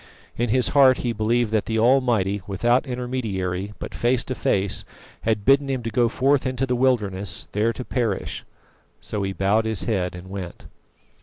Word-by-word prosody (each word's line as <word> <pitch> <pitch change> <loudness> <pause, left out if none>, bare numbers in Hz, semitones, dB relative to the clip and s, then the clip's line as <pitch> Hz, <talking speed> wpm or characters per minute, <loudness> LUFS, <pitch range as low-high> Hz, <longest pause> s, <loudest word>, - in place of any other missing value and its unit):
In 120 0 -1
his 125 +2 +2
heart 135 -2 +6
he 120 - 0
believed 115 +1 +1
that 110 -2 0
the 110 - -1
Almighty, 115 -5 +2
without 120 +7 +1
intermediary, 105 -7 -3
but - - -7
face 125 +1 +1
to 130 - -4
face, 100 -5 -1 0.4
had 110 -2 0
bidden 140 +1 +4
him 130 -3 -2
to 115 - -3
go 120 +1 +2
forth 135 +3 +2
into 130 0 -1
the 125 -1 0
wilderness 105 -7 0
there 110 +3 +1
to 125 +2 -7
perish. 115 -6 -2 0.6
So 105 - -4
he 95 0 -1
bowed 100 +3 +1
his 110 -3 -1
head 90 -5 -1
and 90 +1 -10
went. 95 -3 -7
115 Hz, 175 wpm, -23 LUFS, 100-125 Hz, 0.6 s, heart